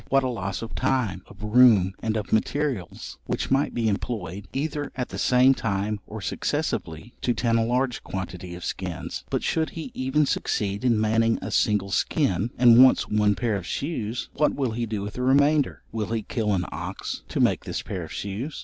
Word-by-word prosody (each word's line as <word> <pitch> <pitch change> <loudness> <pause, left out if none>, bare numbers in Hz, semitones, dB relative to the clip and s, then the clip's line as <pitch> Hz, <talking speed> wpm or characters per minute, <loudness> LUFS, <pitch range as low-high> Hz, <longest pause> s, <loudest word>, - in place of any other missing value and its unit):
What 135 0 +3
a 130 - 0
loss 100 -3 -3
of 115 - -7
time, 125 -8 0
of 100 - -13
room, 105 -4 +5
and 110 -1 -1
of 105 - -4
materials, 125 - -1
which - - -2
might 135 +2 +2
be 115 -2 -1
employed, 100 -3 -3
either 145 +1 -3
at 125 -1 -3
the - - -6
same 125 +1 +5
time 105 -3 -2
or - - -7
successively, 80 +10 -3
to 120 - +1
tan 115 0 +2
a - - +2
large 125 +2 0
quantity 90 -2 -6
of 90 - -8
skins! - - -5
But - - -1
should 160 -1 0
he 160 - -5
even 130 +4 +1
succeed 100 -5 -1
in 120 -4 +3
manning 115 +1 +2
a - - -4
single 100 -2 +1
skin, 115 - +1
and 120 0 +8
wants 130 - +4
one 105 -1 +3
pair 115 -4 0
of 90 -3 -5
shoes, 125 -7 -3
what 150 - +1
will 130 -4 -1
he 115 +1 -2
do 105 -2 -3
with 105 +1 -5
the 125 - -5
remainder? 140 +2 +3
Will 110 -2 -2
he 115 -1 -2
kill 105 -1 -1
an 90 -1 -1
ox - - -5
to - - -3
make - - +2
this - - -4
pair 95 - -4
of 80 - -9
shoes? 105 - -4
115 Hz, 200 wpm, -25 LUFS, 100-130 Hz, -, and